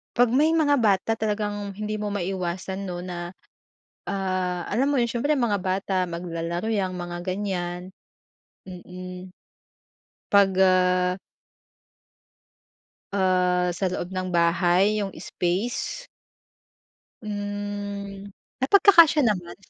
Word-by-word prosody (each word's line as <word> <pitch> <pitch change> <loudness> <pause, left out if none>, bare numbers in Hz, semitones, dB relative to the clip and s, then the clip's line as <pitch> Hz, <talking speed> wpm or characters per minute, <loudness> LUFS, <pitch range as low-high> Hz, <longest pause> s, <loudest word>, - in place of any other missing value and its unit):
'Pag 245 -1 +4
may 305 +6 +3
mga 290 -3 +3
bata 205 -1 +2
talagang 205 -2 -2
hindi 215 +1 -4
mo 210 - -2
maiwasan 190 0 -3
no 175 -1 -5
na, 175 0 -6 0.7
ah, 185 -2 -2
alam 265 +7 +1
mo 280 - +2
yun 235 - +2
siyempre 240 +5 -1
mga 225 -4 +2
bata 190 0 0
maglalaro 170 +1 -4
yang 200 -4 0
mga 175 0 -5
ganyan. 180 -2 -3 0.8
Hmm, 180 0 -9 1.0
pag, 200 -1 +5
ah 180 0 +3 2.0
ah, 180 -2 +2
sa 190 +2 -2
loob 180 - -4
ng 185 -1 -4
bahay 175 +4 +3
yung 195 - -5
space? 190 - -3 1.2
Hmm 205 -1 -5 0.3
napagkakasiya 335 +1 +6
naman. 180 -5 -2
190 Hz, 105 wpm, -25 LUFS, 180-210 Hz, 2.0 s, napagkakasiya